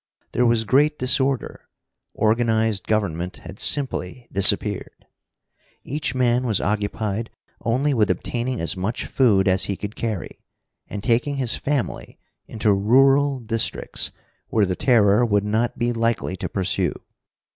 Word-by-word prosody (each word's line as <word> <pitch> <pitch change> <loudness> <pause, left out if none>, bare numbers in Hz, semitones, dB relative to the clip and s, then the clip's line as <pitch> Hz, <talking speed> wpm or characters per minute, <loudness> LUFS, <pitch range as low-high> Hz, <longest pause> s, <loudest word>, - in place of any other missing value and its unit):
There 125 0 +2
was 115 -1 +2
great 145 +7 +2
disorder. 130 +1 0 0.5
Organized 110 -2 +1
government 90 -5 -1
had 95 +4 -10
simply 125 -4 0
disappeared. 100 +1 +2 0.8
Each 145 -1 -3
man 125 -1 +2
was 110 -6 +1
occupied 105 +2 -2 0.3
only 130 +5 +1
with 110 -4 +2
obtaining 125 +1 -2
as 85 - 0
much 95 +6 -3
food 105 -7 +2
as 95 0 +2
he 100 - -3
could 105 +1 -6
carry, 110 -6 -4 0.5
and 100 -1 -6
taking 125 +5 +1
his 130 -4 0
family 140 -3 -3 0.3
into 110 -2 +1
rural 135 +6 +3
districts 115 0 -2 0.4
where 110 -2 +2
the 90 -1 -2
Terror 110 -2 +3
would 105 -3 +1
not 110 +3 -1
be 120 +1 0
likely 115 -4 -1
to - - -4
pursue. 95 -1 -1
115 Hz, 135 wpm, -22 LUFS, 100-125 Hz, 0.8 s, rural